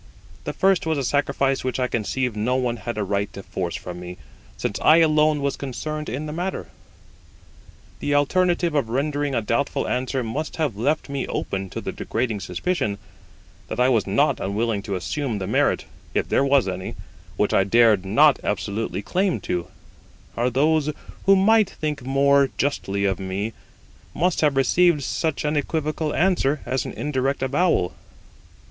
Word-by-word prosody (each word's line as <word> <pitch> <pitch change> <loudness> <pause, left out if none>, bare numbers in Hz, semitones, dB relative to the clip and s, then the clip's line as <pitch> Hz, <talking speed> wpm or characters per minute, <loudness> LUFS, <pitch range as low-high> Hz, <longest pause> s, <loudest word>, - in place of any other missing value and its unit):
The - - -2
first 190 -3 +2
was 160 -1 +1
a 140 - -1
sacrifice 140 0 +1
which 130 0 -2
I 130 - +2
conceive 120 +1 -1
no 115 +4 0
one 125 -2 0
had 120 0 -5
a 105 - 0
right 100 +1 -1
to 100 - -8
force 85 -3 -4
from 90 -1 -7
me, 90 0 -8 0.4
since - - -2
I 155 - +7
alone 155 -2 +3
was 140 -1 0
concerned 150 +3 -5
in 135 +7 -4
the 150 - -5
matter. 175 - -3 1.3
The 145 - 0
alternative 175 +3 +2
of 140 -7 0
rendering 145 +2 -1
a 115 - 0
doubtful 135 +5 0
answer 130 +1 -1
must 140 +8 -4
have 150 -9 -1
left 145 +9 0
me 140 -1 -3
open 95 0 -3
to - - -5
the - - -4
degrading 115 -5 -2
suspicion 100 - -2 0.7
that - - -5
I 125 +1 +4
was 115 -5 +2
not - - +2
unwilling 105 +1 -1
to 100 - 0
assume 115 - -2
the 95 - -3
merit - - +1 0.3
(if - - +1
there - - +3
was 140 -4 +3
any) 95 0 -4 0.4
which - - +1
I 95 - +4
dared 110 -1 +4
not 140 +10 +4
absolutely 100 0 -2
lay - - -21
claim 185 - 0
to; 90 -1 -2 0.7
or 120 +2 +1
those 150 +3 +2 0.4
who 195 - +8
might 215 +1 +4
think 150 -3 -4
more 140 +1 +3
justly 100 -8 -1
of 95 -1 0
me 95 +4 -3 0.6
must 180 +2 +1
have 150 -3 +3
received 155 +3 +3
such 155 +2 -1
an 150 +1 0
equivocal 155 +1 -1
answer 160 -5 +2
as 130 +1 -1
an - - -5
indirect 135 -2 -1
avowal. 140 - +1
135 Hz, 170 wpm, -23 LUFS, 110-150 Hz, 1.3 s, who